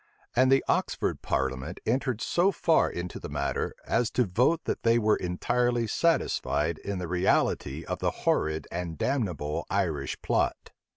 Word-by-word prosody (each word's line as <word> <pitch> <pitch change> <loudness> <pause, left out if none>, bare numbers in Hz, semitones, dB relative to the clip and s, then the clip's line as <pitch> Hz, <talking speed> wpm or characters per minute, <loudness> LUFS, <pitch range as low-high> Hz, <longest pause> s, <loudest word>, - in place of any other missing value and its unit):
And 130 +1 +4
the 135 - +4
Oxford - - 0
parliament 65 +5 -2
entered 125 -1 0
so 180 +3 +2
far 165 -3 +3
into 85 +1 -5
the - - -7
matter, - - -2
as 115 -1 +1
to 125 - +3
vote 125 - +2
that - - -2
they 115 0 +4
were 110 -2 +3
entirely 120 +6 0
satisfied 85 - +1
in 100 -1 -4
the 90 -1 -4
reality 90 +2 +1
of - - -3
the - - +1 0.2
horrid 80 -1 +1
and 85 -2 -4
damnable 90 - -1
Irish 80 -8 -1
plot. - - 0
100 Hz, 155 wpm, -28 LUFS, 85-125 Hz, 0.2 s, And